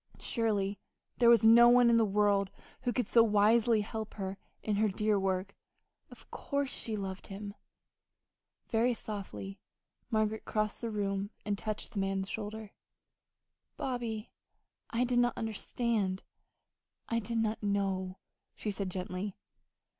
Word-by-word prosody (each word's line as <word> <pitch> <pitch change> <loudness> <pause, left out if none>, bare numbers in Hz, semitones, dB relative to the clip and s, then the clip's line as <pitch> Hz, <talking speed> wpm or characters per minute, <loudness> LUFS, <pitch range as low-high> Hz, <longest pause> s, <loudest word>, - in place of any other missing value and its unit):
Surely 205 -4 -1 0.4
there 235 -1 +6
was 235 -1 +6
no 235 +2 +9
one 245 0 +6
in 235 0 +5
the 230 - +5
world 200 -1 +2 0.3
who 245 - 0
could 250 -1 0
so 230 - +6
wisely 220 +1 +4
help 220 +1 -5
her 195 -1 -4 0.2
in 210 -2 0
her 215 +1 +3
dear 210 +1 +1
work. 190 0 -1 0.5
Of - - -16
course 280 -1 -2
she 225 - -2
loved 190 -1 -5
him! 200 +1 -7 1.1
Very 235 +2 +2
softly 195 -2 -6 0.5
Margaret 220 -1 0
crossed 215 -1 -1
the 230 - -2
room 200 -2 -2 0.2
and 205 -1 0
touched 215 +1 -4
the 210 - -3
man's 195 0 -1
shoulder. 215 -1 -5 1.1
"Bobby, 235 -4 -3 0.6
I 235 +1 +1
did 245 -1 +2
not 245 0 +2
understand 220 -3 -1 0.8
I 230 - +1
did 230 +1 -3
not 225 -1 0
know," 195 -2 -1 0.4
she 210 - -3
said 200 -1 -3
gently. 185 +2 -4
215 Hz, 140 wpm, -32 LUFS, 195-230 Hz, 1.1 s, no